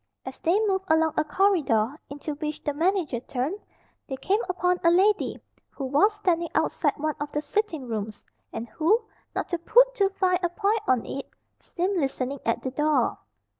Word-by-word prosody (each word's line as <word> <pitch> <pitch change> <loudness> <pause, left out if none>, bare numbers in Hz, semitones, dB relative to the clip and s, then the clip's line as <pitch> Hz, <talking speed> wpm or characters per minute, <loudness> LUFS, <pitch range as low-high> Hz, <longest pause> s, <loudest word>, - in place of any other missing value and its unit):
As - - -7
they 345 +5 +2
moved 385 -2 0
along 320 -1 +3
a 310 - +2
corridor, 295 - +2
into 290 +2 -5
which 300 0 -5
the 295 - -1
manager 330 -5 0
turned, 265 - -3 0.5
they 265 - -2
came 390 +10 +1
upon 360 0 +1
a 335 - +6
lady 390 +4 +3 0.3
who 275 - -6
was 300 +11 +3
standing 345 -5 0
outside - - +1
one 310 +1 -1
of 295 0 -4
the 295 - -1
sitting 320 - -2
rooms, 215 -2 -5 0.3
and 230 - -5
who, 425 - +2 0.3
not - - -2
to 345 - -1
put - - +5
too 400 -5 +2
fine 370 -2 +1
a 350 - +1
point 415 +4 0
on 255 -3 +2
it, 275 - -6 0.3
seemed 370 +2 -2
listening 270 -1 -2
at 230 - 0
the 260 - -2
door. 300 +3 +1
325 Hz, 180 wpm, -26 LUFS, 280-385 Hz, 0.5 s, a